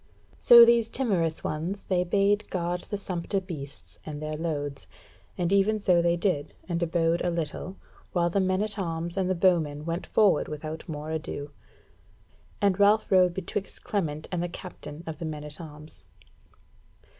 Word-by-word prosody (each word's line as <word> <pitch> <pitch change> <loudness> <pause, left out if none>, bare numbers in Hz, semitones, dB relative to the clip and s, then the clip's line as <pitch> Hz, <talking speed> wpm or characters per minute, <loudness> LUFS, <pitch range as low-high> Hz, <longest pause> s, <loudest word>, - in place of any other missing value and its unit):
So 235 -1 +10
these 235 -1 +4
timorous 180 -11 0
ones 170 +6 -3
they 180 -2 +1
bade 200 +3 +1
guard 175 -1 -2
the 205 - -2
sumpter 190 0 -2
beasts 155 -7 -8
and 150 -2 -6
their 155 0 -4
loads; 145 -3 -4 0.5
and 175 +1 0
even 205 +2 +3
so 180 -4 +3
they 170 0 +2
did, 170 -6 -1
and 175 -1 -2
abode 170 0 +1
a 175 - +1
little, 170 +2 -3 0.4
while 175 -1 +2
the 200 - +2
men 185 +1 +1
at 215 -1 -2
arms 170 -1 -3
and 190 -1 0
the 185 - +1
bowmen 160 -5 +2
went 170 +1 -3
forward 200 -8 +3
without 155 +3 -6
more 150 0 -5
ado; 150 -2 -4 1.1
and 200 -1 +2
Ralph 205 +2 +4
rode 180 -2 +5
betwixt 190 +1 -4
Clement 155 -7 -2
and 180 -2 -1
the 175 - -2
captain 170 -3 -9
of 160 -2 -6
the 165 - -4
men 150 -1 -5
at 150 +2 -4
arms. 150 -1 -8
170 Hz, 165 wpm, -27 LUFS, 155-195 Hz, 1.1 s, So